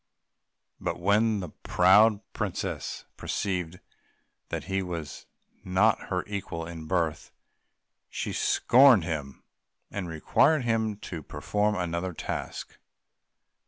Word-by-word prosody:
But -, -, -3 dB
when 105 Hz, +3 st, +2 dB
the 90 Hz, -, -6 dB
proud 100 Hz, +7 st, +4 dB
princess -, -, -4 dB
perceived 90 Hz, -3 st, -3 dB, 0.7 s
that -, -, -3 dB
he 95 Hz, 0 st, -1 dB
was 85 Hz, -5 st, -6 dB, 0.4 s
not 100 Hz, +4 st, +2 dB
her 90 Hz, -1 st, -1 dB
equal 95 Hz, -5 st, -5 dB
in 80 Hz, -2 st, -8 dB
birth, 85 Hz, -3 st, -1 dB, 0.8 s
she -, -, -4 dB
scorned 125 Hz, -6 st, +5 dB
him, 75 Hz, -5 st, -5 dB, 0.5 s
and 95 Hz, -3 st, -4 dB
required 135 Hz, -, +3 dB
him 110 Hz, -2 st, 0 dB
first 100 Hz, -, -20 dB
to 85 Hz, -3 st, -4 dB
perform 105 Hz, +9 st, -1 dB
another 90 Hz, 0 st, -2 dB
task. -, -, -5 dB
95 Hz, 110 wpm, -28 LUFS, 85-105 Hz, 0.8 s, scorned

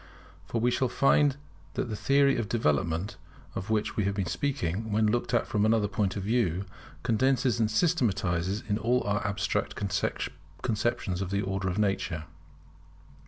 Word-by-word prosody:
For 115 Hz, -, -1 dB
we 120 Hz, +2 st, +2 dB
shall 130 Hz, 0 st, +1 dB
find 140 Hz, +1 st, +3 dB, 0.4 s
that -, -, -1 dB
the 110 Hz, -, -3 dB
theory 140 Hz, +4 st, +3 dB
of 115 Hz, -4 st, -2 dB
development 85 Hz, -1 st, 0 dB, 0.4 s
of 95 Hz, -, -5 dB
which 110 Hz, -1 st, 0 dB
we 105 Hz, -, +1 dB
have 100 Hz, 0 st, 0 dB
been 100 Hz, -2 st, -1 dB
speaking, 105 Hz, -, -2 dB
when 110 Hz, +1 st, +3 dB
looked 115 Hz, +2 st, +1 dB
at 120 Hz, -2 st, +2 dB
from 105 Hz, -1 st, 0 dB
another 110 Hz, -1 st, +3 dB
point 100 Hz, -3 st, -1 dB
of 100 Hz, -, -3 dB
view, 100 Hz, -4 st, +1 dB, 0.4 s
condenses 125 Hz, 0 st, +2 dB
and 110 Hz, -2 st, +2 dB
systematizes 100 Hz, -, +1 dB, 0.2 s
all 125 Hz, +2 st, +2 dB
our 100 Hz, 0 st, 0 dB
abstract 100 Hz, -1 st, -1 dB
conceptions 95 Hz, -, -2 dB
of 95 Hz, -, -2 dB
the 100 Hz, +1 st, 0 dB
order 95 Hz, 0 st, -1 dB
of 90 Hz, -, -3 dB
nature. 95 Hz, -6 st, 0 dB
105 Hz, 160 wpm, -28 LUFS, 95-120 Hz, 0.4 s, find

